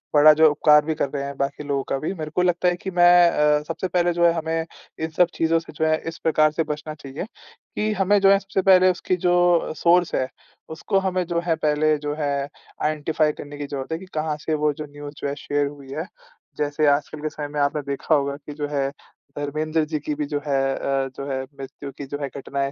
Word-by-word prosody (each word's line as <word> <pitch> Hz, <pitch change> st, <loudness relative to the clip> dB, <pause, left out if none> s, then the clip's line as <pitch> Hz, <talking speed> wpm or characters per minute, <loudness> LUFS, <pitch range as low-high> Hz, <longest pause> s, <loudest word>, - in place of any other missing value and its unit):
बड़ा 150 Hz, +1 st, +9 dB
जो 155 Hz, +1 st, +6 dB
उपकार 150 Hz, 0 st, +5 dB
भी 160 Hz, 0 st, -1 dB
कर 140 Hz, -, -1 dB
रहे 140 Hz, 0 st, -4 dB
हैं 140 Hz, 0 st, -5 dB
बाकी 140 Hz, +2 st, -2 dB
लोगों 140 Hz, -2 st, -1 dB
का -, -, 0 dB
भी। 155 Hz, +7 st, -3 dB
मेरे 155 Hz, -4 st, -6 dB
को -, -, +3 dB
लगता 180 Hz, 0 st, +2 dB
है 180 Hz, -, +3 dB
कि 190 Hz, +2 st, -6 dB
मैं 175 Hz, -1 st, +6 dB
अ, 150 Hz, -1 st, +3 dB
सबसे 165 Hz, +3 st, -3 dB
पहले 175 Hz, -1 st, +1 dB
जो 170 Hz, 0 st, +2 dB
है 170 Hz, -, +6 dB
हमें 165 Hz, 0 st, -2 dB, 0.3 s
इन 160 Hz, 0 st, -2 dB
सब 180 Hz, -, +6 dB
चीज़ों 165 Hz, 0 st, +2 dB
से 165 Hz, -, -13 dB
जो 160 Hz, +1 st, -1 dB
है, 155 Hz, 0 st, +3 dB
इस 165 Hz, -, -5 dB
प्रकार 155 Hz, -1 st, +3 dB
से 160 Hz, +2 st, 0 dB
बचना 150 Hz, +1 st, -5 dB
चाहिए 145 Hz, +2 st, -7 dB, 0.5 s
कि 215 Hz, +1 st, 0 dB
हमें 200 Hz, +2 st, +4 dB
जो 195 Hz, 0 st, +6 dB
है, 195 Hz, -, +5 dB
सबसे 195 Hz, -1 st, -2 dB
पहले 185 Hz, -1 st, +6 dB
उसकी 185 Hz, +1 st, -1 dB
जो 175 Hz, -2 st, +3 dB
सोर्स 175 Hz, +2 st, +3 dB
है, 130 Hz, -, 0 dB, 0.4 s
उसको 175 Hz, +5 st, 0 dB
हमें 185 Hz, -1 st, 0 dB
जो 170 Hz, 0 st, -1 dB
है 165 Hz, -, +3 dB
पहले 155 Hz, 0 st, +2 dB
जो 145 Hz, -, -1 dB
है, 140 Hz, -1 st, -1 dB, 0.4 s
आइडेंटिफ़ाइ 155 Hz, 0 st, +1 dB
करने 145 Hz, 0 st, -9 dB
की 145 Hz, 0 st, -5 dB
ज़रूरत 140 Hz, 0 st, -5 dB
है 160 Hz, -, -1 dB
कि 190 Hz, -, -10 dB
कहाँ 155 Hz, 0 st, -1 dB
से 160 Hz, -, 0 dB
वो 150 Hz, -, +3 dB
जो 150 Hz, +2 st, -7 dB
न्यूज़ 145 Hz, 0 st, -10 dB
जो -, -, -1 dB
है 140 Hz, -, -3 dB
शेयर 145 Hz, 0 st, +1 dB
हुई 140 Hz, -2 st, -10 dB
है। 160 Hz, +5 st, -4 dB, 0.5 s
जैसे 150 Hz, +1 st, +1 dB
आजकल 145 Hz, +1 st, +1 dB
के 155 Hz, -, -2 dB
समय 150 Hz, -1 st, -6 dB
में 145 Hz, 0 st, -5 dB
आपने 145 Hz, +1 st, +1 dB
देखा 140 Hz, +3 st, +1 dB
होगा 140 Hz, -1 st, 0 dB
कि 145 Hz, +1 st, -10 dB
जो 145 Hz, 0 st, -3 dB
है, 140 Hz, -2 st, -1 dB, 0.5 s
धर्मेंद्र 155 Hz, +2 st, -1 dB
जी 155 Hz, 0 st, -3 dB
की 150 Hz, +1 st, -3 dB
भी 150 Hz, 0 st, -2 dB
जो 145 Hz, 0 st, -2 dB
है 140 Hz, -2 st, 0 dB, 0.2 s
अ, 135 Hz, -1 st, -1 dB
जो 140 Hz, -, -5 dB
है 130 Hz, 0 st, -1 dB
मृत्यु 140 Hz, +1 st, -9 dB
की 140 Hz, -, -6 dB
जो 145 Hz, +1 st, -5 dB
है, 140 Hz, -, -1 dB
घटनाएँ 140 Hz, 0 st, -3 dB
150 Hz, 245 wpm, -23 LUFS, 145-165 Hz, 0.5 s, बड़ा